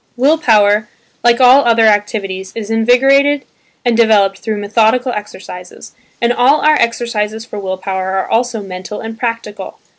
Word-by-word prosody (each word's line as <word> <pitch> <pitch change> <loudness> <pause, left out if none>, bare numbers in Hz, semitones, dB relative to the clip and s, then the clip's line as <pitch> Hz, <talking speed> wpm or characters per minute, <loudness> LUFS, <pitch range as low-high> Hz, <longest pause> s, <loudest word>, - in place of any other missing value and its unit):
Will 290 +6 +2
power, 210 -5 +2 0.3
like 240 0 +3
all 260 +2 +6
other 230 -1 +3
activities 205 -3 -1
is 225 -1 -6
invigorated 270 +5 +2 0.4
and 240 -1 +2
developed 205 -4 +2
through 220 -2 -4
methodical 225 +5 +1
exercises, 190 -4 -9 0.3
and 235 0 +1
all 260 +5 +2
our 305 - +4
exercises 225 -4 -2
for 210 -3 -8
will 190 -1 -4
power 190 0 -4
are 190 - -2
also 230 -2 -1
mental 185 +2 -8
and 225 0 -7
practical. 230 -4 -5
225 Hz, 150 wpm, -14 LUFS, 205-245 Hz, 0.4 s, all